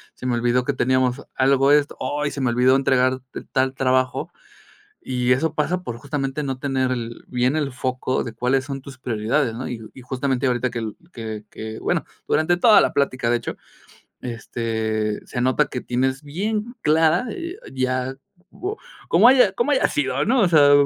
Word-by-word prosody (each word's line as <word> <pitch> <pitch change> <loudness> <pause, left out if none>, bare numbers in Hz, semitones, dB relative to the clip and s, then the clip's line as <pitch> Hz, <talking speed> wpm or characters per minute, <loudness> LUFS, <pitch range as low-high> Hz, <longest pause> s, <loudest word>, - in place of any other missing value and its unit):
se - - -10
me 125 - +1
olvidó 120 +1 +2
que 140 - -1
teníamos 130 0 +1
algo 135 +1 +4
de 150 - +7
esto, 145 - -6 0.3
ay 150 - -1
se - - -6
me 130 - +2
olvidó 125 +2 +4
entregarte 130 -1 0
tal 130 0 +1
trabajo", 130 -1 0 0.7
y 125 -1 +1
eso 155 +5 +1
pasa 175 +4 0
por 120 - -5
justamente 135 +2 -3
no 135 -2 -3
tener 130 -1 0
el 120 -2 -5
bien 125 +2 +1
el 145 -3 -1
foco 130 0 -2
de 115 - -6
cuáles 125 +3 +1
son 135 0 -6
tus 135 -1 -11
prioridades, 115 +2 0
¿no? 125 +3 -5
Y 110 -3 -7
y 130 - -11
justamente 130 +1 -1
ahorita 125 0 0
que 120 - -4
el 110 -2 -5 0.2
que 110 -2 -6
que 110 0 -7
que, - - -8
bueno - - 0 0.2
durante 160 +3 +2
toda 215 +2 +7
la - - +2
plática 130 -4 0
de 120 - +3
hecho 115 - -6 0.7
este, 110 -2 -3
se 125 - -4
nota 130 +1 +2
que 125 - -4
tienes 130 +3 -1
bien 210 - -3
clara, 160 +7 +3
eh 345 0 -5 0.2
ya, 130 0 -1 0.4
como 400 +4 -5 0.3
como - - +6
haya 250 -7 +5
como 235 +8 0
haya 270 - +3
sido, 300 - 0
¿no? 245 +3 +3
O 190 - +4
sea, 145 -4 +6
130 Hz, 190 wpm, -22 LUFS, 125-145 Hz, 0.7 s, de